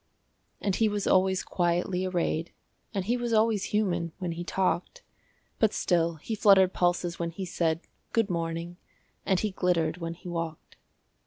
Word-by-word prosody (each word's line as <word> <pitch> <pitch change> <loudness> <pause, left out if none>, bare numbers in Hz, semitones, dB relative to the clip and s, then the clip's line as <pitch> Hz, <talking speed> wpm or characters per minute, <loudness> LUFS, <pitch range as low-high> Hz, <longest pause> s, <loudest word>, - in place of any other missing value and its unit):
And 200 -2 0
he 220 -1 +3
was 205 -1 -2
always 190 0 +3
quietly 180 +1 0
arrayed, 170 -2 -1 0.4
And 195 -2 -2
he 240 +4 +1
was 240 -1 -2
always 220 -2 +3
human 175 -6 0
when 180 -3 -3
he 170 +1 -4
talked; 185 -1 -1 0.6
But 220 -2 +3
still 170 -2 +1
he 160 +8 -6
fluttered 195 -3 +5
pulses 175 -1 0
when 170 -1 -1
he 185 +3 -5
said, 165 -2 0 0.3
"Good 225 -3 +2
morning," 170 -1 -3 0.5
and 190 -2 +3
he 210 +1 -1
glittered 175 -3 +1
when 165 -1 -4
he 180 - -12
walked. 165 -2 -5
180 Hz, 160 wpm, -28 LUFS, 170-195 Hz, 0.6 s, fluttered